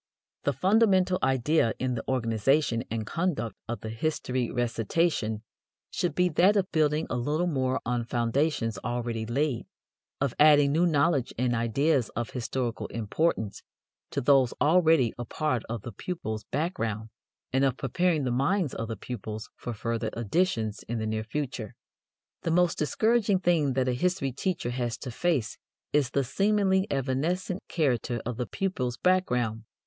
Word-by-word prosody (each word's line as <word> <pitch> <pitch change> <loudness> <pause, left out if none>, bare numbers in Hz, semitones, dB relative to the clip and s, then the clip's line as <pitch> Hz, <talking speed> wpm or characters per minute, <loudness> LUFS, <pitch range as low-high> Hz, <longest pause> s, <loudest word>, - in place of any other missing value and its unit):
The 145 - +2
fundamental 190 - +3
idea 130 -1 +2
in 130 -1 -1
the 115 - -3
organization 120 +1 +1
and 110 -1 -3
conduct 165 - -2
of 120 +1 -4
the 110 - -5
history 125 -1 -1
recitation 115 - 0 0.5
should 175 - -1
be 180 0 +3
that 180 +6 +4
of 195 -2 +1
building 155 -1 +2
a - - 0
little 150 +8 0
more 130 -6 0
on 120 0 -1
foundations 120 -2 0
already 120 0 -3
laid, 135 +1 -1 0.5
of 135 -3 0
adding 145 -1 +6
new 170 +4 +3
knowledge 145 -4 +1
and 125 0 +1
ideas 120 +3 +1
of 120 0 -3
historical 125 -1 -3
importance 110 0 -1 0.5
to - - -2
those 130 -2 +4
already 160 -6 +4
a - - -2
part 140 -1 -1
of 115 -3 -4
the 120 - -6
pupils' 110 - -5
background, 115 - -2 0.4
and 135 +1 +3
of 135 -3 +2
preparing 160 +4 +1
the 125 - 0
minds 145 +5 +1
of 115 - -4
the 115 - -5
pupils 110 -3 -6
for 120 - -6
further 115 +1 -2
additions 115 - 0
in 120 - -1
the 110 - -2
near 110 0 -1
future. 120 -3 -4 0.7
The - - -2
most 175 +1 +2
discouraging 210 +4 +2
thing 160 -7 +2
that 130 0 +1
a 125 - +2
history 175 0 0
teacher 150 -2 -2
has 120 -1 -2
to 125 - -6
face 135 -5 -1 0.3
is 145 -4 +3
the 140 +1 +1
seemingly 195 - +2
evanescent 155 +8 -1
character 125 -6 0
of 120 -1 -3
the 125 - -2
pupils' 130 -11 -2
background. 125 - +1
130 Hz, 155 wpm, -28 LUFS, 115-165 Hz, 0.7 s, adding